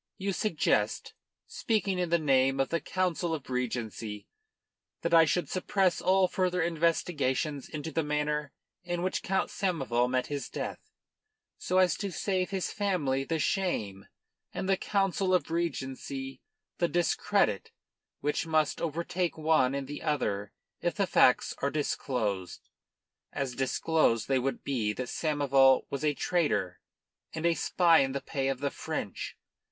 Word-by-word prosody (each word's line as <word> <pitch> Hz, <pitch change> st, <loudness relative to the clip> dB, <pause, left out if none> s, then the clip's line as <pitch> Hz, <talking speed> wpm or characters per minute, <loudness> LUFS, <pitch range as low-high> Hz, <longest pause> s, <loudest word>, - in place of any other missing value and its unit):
You 195 Hz, -1 st, -2 dB
suggest, 155 Hz, -, 0 dB, 0.3 s
speaking 200 Hz, -4 st, -1 dB
in 180 Hz, -2 st, 0 dB
the 170 Hz, -, +4 dB
name 135 Hz, -3 st, +2 dB
of 135 Hz, -, +1 dB
the 170 Hz, -, 0 dB
Council 175 Hz, -3 st, -1 dB
of 140 Hz, -4 st, -9 dB
Regency, 115 Hz, -4 st, -3 dB, 0.8 s
that -, -, -1 dB
I 165 Hz, -1 st, +8 dB
should 175 Hz, +3 st, 0 dB
suppress 185 Hz, 0 st, +1 dB
all 185 Hz, 0 st, +4 dB
further 180 Hz, -1 st, 0 dB
investigations 155 Hz, -4 st, 0 dB
into 155 Hz, +1 st, -5 dB
the 165 Hz, -, 0 dB
manner 150 Hz, -1 st, -1 dB, 0.3 s
in 175 Hz, 0 st, -3 dB
which 185 Hz, -, -1 dB
Count 190 Hz, 0 st, -1 dB
Samoval 135 Hz, -10 st, 0 dB
met 130 Hz, -1 st, +1 dB
his 145 Hz, -1 st, -4 dB
death, -, -, -4 dB, 0.8 s
so 185 Hz, -, 0 dB
as 185 Hz, -3 st, +4 dB
to 200 Hz, -2 st, -3 dB
save 185 Hz, 0 st, -1 dB
his 190 Hz, -3 st, -2 dB
family 160 Hz, -10 st, 0 dB
the 165 Hz, +4 st, -1 dB
shame 110 Hz, -, -1 dB, 0.4 s
and -, -, -4 dB
the 195 Hz, -, +4 dB
Council 195 Hz, -1 st, +1 dB
of 160 Hz, -3 st, -1 dB
Regency 135 Hz, -5 st, -3 dB, 0.4 s
the 175 Hz, -, +3 dB
discredit 175 Hz, -1 st, +1 dB, 0.5 s
which 150 Hz, +3 st, -1 dB
must 155 Hz, -2 st, +1 dB
overtake 170 Hz, +2 st, -2 dB
one 155 Hz, -4 st, +3 dB
and 140 Hz, -1 st, -3 dB
the 145 Hz, +1 st, -6 dB
other 105 Hz, -10 st, -1 dB, 0.3 s
if -, -, -1 dB
the -, -, +1 dB
facts -, -, +4 dB
are 140 Hz, -, +1 dB
disclosed 115 Hz, -10 st, -2 dB, 0.6 s
as 135 Hz, -2 st, -3 dB
disclosed 130 Hz, -2 st, +1 dB
they 135 Hz, -1 st, +2 dB
would 135 Hz, +2 st, -2 dB
be 115 Hz, -7 st, -1 dB
that 125 Hz, +2 st, -5 dB
Samoval 140 Hz, -4 st, +3 dB
was 140 Hz, 0 st, -3 dB
a 150 Hz, -1 st, +2 dB
traitor 145 Hz, -, 0 dB, 0.6 s
and 160 Hz, +1 st, -3 dB
a 170 Hz, -, +4 dB
spy 165 Hz, +2 st, +4 dB
in 135 Hz, -1 st, +1 dB
the 140 Hz, -, -2 dB
pay 135 Hz, -3 st, -2 dB
of 135 Hz, -1 st, -2 dB
the 140 Hz, -, 0 dB
French. -, -, -5 dB
150 Hz, 150 wpm, -29 LUFS, 135-175 Hz, 0.8 s, I